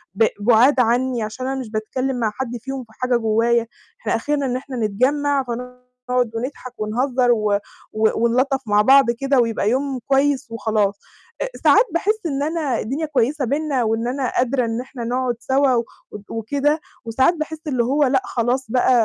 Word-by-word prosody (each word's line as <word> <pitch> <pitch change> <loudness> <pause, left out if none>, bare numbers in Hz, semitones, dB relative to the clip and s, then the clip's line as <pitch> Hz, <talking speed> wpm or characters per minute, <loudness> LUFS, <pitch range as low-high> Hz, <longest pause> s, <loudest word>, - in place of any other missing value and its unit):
ب 225 - +4
بُعاد 240 +6 +4
عني، 245 0 +1
عشان 215 +5 -5
أنا 270 0 -2
مش 245 - -6
باتكلم 255 +4 -2
مع 220 -3 0
حد 245 -2 -4
فيهم 270 +1 -5
في 225 - -21
حاجة 250 +1 0
جوايا، 230 +1 +1 0.3
إحنا - - 0
آخرنا 290 -2 -1
إن 250 - -1
إحنا 260 0 -5
نتجمّع، 270 +6 +1
فنقعد 250 0 -4
ونضحك 255 +1 -5
ونهزر 245 +3 +1
و 210 -3 +2 0.3
و 220 0 +3 0.2
ونلطّف 265 +3 +1
مع 205 0 +4
بعض 270 +1 +6
كده 270 +3 +1
ويبقى 230 -3 +1
يوم 265 +2 -1
كويس 275 -2 +1
وخلاص، 215 -3 0 0.4
آآ، - - -1
ساعات - - +6
باحس 425 +6 +1
إن 280 -2 -1
أنا 305 -6 -1
الدنيا 275 +8 -2
كويسة 275 0 0
بيننا، 280 -1 0
وإن 225 +1 0
أنا 255 0 -2
قادرة 250 0 +1
إن 225 +2 -2
إحنا 255 -1 -8
نقعد 245 +1 -1
سوا 265 +2 +2
و 235 -1 0 0.4
وكده، 285 +7 0 0.3
وساعات 260 +8 +3
باحس 310 0 -5
اللي 255 -5 +1
هو 285 +4 +2
لأ 265 -1 +2
خلاص 245 0 -1
بقى 255 +1 +3
250 Hz, 175 wpm, -21 LUFS, 230-275 Hz, 0.4 s, بعض